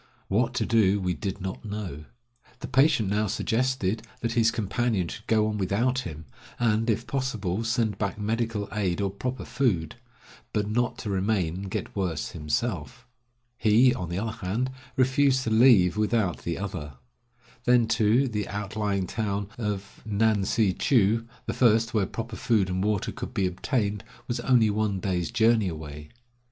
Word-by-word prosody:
What 120 +5 +1
to - - +1
do 105 -4 +3
we 90 -2 0
did 100 +1 -4
not 95 0 -5
know. 100 -8 -6 0.6
The - - -4
patient 135 -5 +3
now 105 +1 +1
suggested 115 -1 0 0.2
that 115 - -1
his 115 -1 +3
companion 110 -3 -1
should 105 - -9
go 110 -1 +3
on 105 -1 -2
without 115 +7 +1
him, 80 -9 -7 0.3
and, 115 -1 +1
if 115 +2 0
possible, 115 -6 -2
send 115 -3 0
back 100 -1 -2
medical 110 -1 -1
aid 100 -5 -1
or 100 -1 0
proper 125 +6 -4
food; 95 - 0 0.6
but 105 -1 0
not 120 +2 0
to 105 - -4
remain 95 -3 0
and 95 +2 -6
get - - -4
worse 90 -6 -2
himself. 80 - -3 0.5
He, 115 +4 +5
on 90 -2 -4
the 85 - -3
other 110 +1 -4
hand, 120 +7 -1 0.3
refused 130 0 +3
to 115 - -2
leave 110 -5 +5
without 105 -3 +1
the 85 -1 -3
other. 90 -8 -5 0.7
Then 120 -2 +4
too, 115 +4 +3
the 105 -4 -2
outlying 105 -1 -2
town 100 0 -2
of 100 -3 -4
Ngan 105 -1 +2
si 105 -5 +2
chou, 115 0 +2 0.2
the - - -2
first 115 -2 +3
where 105 -4 +2
proper 115 0 -5
food 105 -6 +2
and 95 +1 -1
water 105 -2 0
could - - -7
be 95 - +2
obtained, 105 +3 -1 0.2
was 120 0 -2
only 120 -4 +4
one 105 -2 0
day's 90 -2 -1
journey 115 -2 +3
away. 75 -3 -7
105 Hz, 165 wpm, -26 LUFS, 95-115 Hz, 0.7 s, He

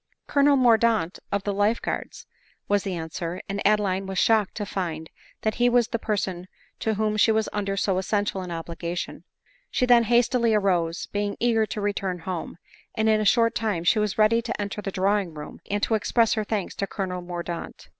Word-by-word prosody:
" - - -58
Colonel 285 0 +4
Mordaunt 230 -7 +3
of 200 -1 0
the 205 - -1
life 205 +3 +2
guards," - - -5 0.4
was 205 0 +2
the 190 -2 -3
an 160 -1 -5
swer; 170 +2 -4
and 200 0 -3
Adeline 195 -2 +1
was 190 -1 -4
shocked 220 -2 +3
to 210 - -3
find 165 -5 -4 0.3
that 220 - +1
he 245 - +5
was 240 -2 +3
the 230 - -2
person 190 -5 -2 0.3
to 220 -1 0
whom 215 0 0
she 220 - +5
was 220 0 +1
under 195 -1 -2
so 190 -2 +1
essential 200 0 -1
an 180 - -6
obligation* 170 +1 -5 0.4
She 255 - +1
then 240 -2 +5
hastily 235 0 +3
arose, 175 -5 +1
being 205 0 -2
eager 225 -2 +2
to 210 - -4
return 200 -3 -1
home; 175 -1 -5 0.4
and 220 0 +1
in 215 -1 +4
a - - -1
short 230 +2 +4
time 210 -5 -1
she 215 +5 +3
was 210 -2 -1
ready 220 +2 +4
to 235 -1 -4
enter 205 0 -3
the 200 - -4
drawing 195 -2 0
room, 150 0 -8
and 205 0 -1
to - - +1
express 225 +1 +2
her 215 - -1
thanks 210 -3 -3
to 200 - -1
Colonel 185 -3 -4
Mordaunt. 175 -1 -6
205 Hz, 205 wpm, -25 LUFS, 185-220 Hz, 0.4 s, he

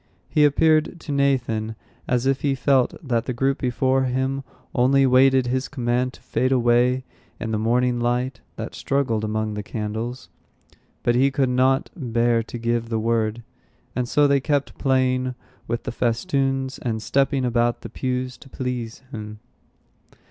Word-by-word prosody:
He 150 -1 +4
appeared 155 +3 +3
to - - -6
Nathan 125 -6 0 0.3
as 125 0 +1
if 135 0 +1
he 140 -2 +1
felt 135 -1 +2
that 120 -2 +1
the 125 - -2
group 135 +2 +1
before 130 +1 +1
him 130 +2 -1 0.3
only 135 +2 +4
waited 130 0 +5
his 130 +2 -1
command 125 -1 -1
to - - -16
fade 130 +1 0
away 125 +1 +3 0.4
in 115 - -3
the 110 - 0
morning 120 +2 +1
light 120 +1 -1
that - - -6
struggled 125 -6 0
among 110 0 -1
the 105 - -3
candles, 110 +4 -4 0.8
but 120 - +3
he 130 +3 +4
could 135 -1 +1
not 130 +2 +2
bear 120 - +1
to 115 +1 -7
give 115 0 -1
the 115 - 0
word; 115 0 0 0.5
and 125 -1 -1
so 150 - +4
they 140 -1 +4
kept 145 0 -1
playing 130 -1 +1 0.3
with 115 +1 -2
the - - -3
festoons, 135 +2 0
and 110 -3 -3
stepping 135 0 +1
about 120 -1 +1
the - - -7
pews 130 0 -3
to 135 - -15
please 125 -2 -4
him. 105 -2 -7
125 Hz, 160 wpm, -23 LUFS, 120-135 Hz, 0.8 s, waited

